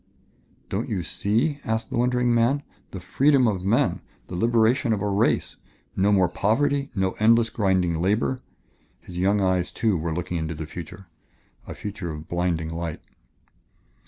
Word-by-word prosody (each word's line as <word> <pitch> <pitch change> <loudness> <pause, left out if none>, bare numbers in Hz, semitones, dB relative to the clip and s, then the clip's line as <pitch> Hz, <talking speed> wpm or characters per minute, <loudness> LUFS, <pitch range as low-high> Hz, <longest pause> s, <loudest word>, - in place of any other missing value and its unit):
"Don't 105 +6 -3
you 95 -6 -2
see?" 120 - 0
asked 110 0 -2
the - - -2
wondering 125 0 +2
man. 120 +5 +2 0.3
"The 95 - -7
freedom 130 +8 +3
of 95 -4 -1
men 120 +8 +1 0.3
the 90 - -5
liberation 115 +4 +2
of 100 - -2
a - - 0
race. 100 +3 +1 0.4
No 100 +2 +2
more 95 -3 +4
poverty, 140 +10 +1
no 95 -1 +1
endless, 115 +1 +4
grinding 90 -5 +1
labor." 105 +7 +1 0.6
His 90 -1 -8
young 100 +2 +2
eyes, 95 -2 +1
too, 110 -4 +1
were 80 +1 -2
looking 90 +2 -3
into 80 0 -3
the 80 +1 -5
future, 85 +4 -9 0.6
a - - -7
future 100 -4 -5
of 75 0 -7
blinding 85 -2 -1
light. 85 -1 -4
100 Hz, 160 wpm, -24 LUFS, 90-115 Hz, 0.6 s, more